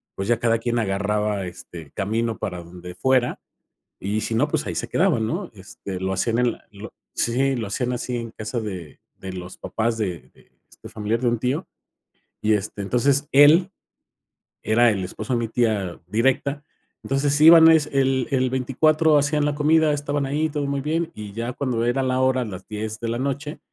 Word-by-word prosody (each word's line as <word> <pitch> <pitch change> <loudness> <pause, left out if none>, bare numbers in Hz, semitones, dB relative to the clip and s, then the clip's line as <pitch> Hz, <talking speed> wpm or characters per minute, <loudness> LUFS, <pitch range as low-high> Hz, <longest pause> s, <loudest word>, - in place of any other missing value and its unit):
pues 95 - -4
ya 120 -1 +3
cada 115 -1 +2
quien 120 +1 -1
agarraba 105 -1 -1
este 85 -4 -10
camino 110 +3 -1
para 90 -3 -5
donde 90 +1 -10
fuera 125 +6 +1 0.6
y 105 +3 -2
si 115 - -2
no, - - +2
pues - - -1
ahí - - -4
se - - -2
quedaban, 110 -1 +1
¿no? 175 - -4
Este 95 -1 -8
lo 95 +1 -2
hacían 115 +5 0
en 125 -1 +2
la - - -17
lo 105 +1 -10 0.2
sí 135 +3 +1
lo 115 -3 -3
hacían 125 +5 -2
así 125 0 -3
en 115 -1 -6
casa 110 +2 -4
de 90 -8 -7 0.2
de 95 -1 -7
los 90 0 -8
papás 115 0 -2
de 90 -7 -4
de - - -25 0.2
este - - -13
familiar, 110 +2 -2
de 125 - 0
un 120 -1 +1
tío 130 +9 -1 0.7
y 110 0 +2
este, 105 0 -2
entonces 135 +7 +1
él 150 +7 +6 0.9
era 120 +2 +4
el 95 -3 -2
esposo 110 +7 -5
de 120 - +1
mi 115 - -2
tía 110 -6 -1
directa, 135 +7 0 0.4
entonces 140 +1 0
iban 160 +1 +9
es 155 -2 +3
el 135 -2 +1
el 130 -1 +2
24 150 +5 +3
hacían 150 +1 +1
la 150 0 0
comida, 155 +1 +3
estaban 145 -1 -2
ahí, 150 +4 0
todo 145 -1 -2
muy 140 0 -2
bien, 160 +3 -1
y 105 -1 -8
ya 115 +3 -4
cuando 125 -3 -1
era 125 +3 +1
la 130 0 0
hora 130 -1 +2
las 95 -5 -8
10 110 +1 -5
de 115 - -4
la 120 +1 -2
noche 140 +3 -3
120 Hz, 195 wpm, -23 LUFS, 105-140 Hz, 0.9 s, iban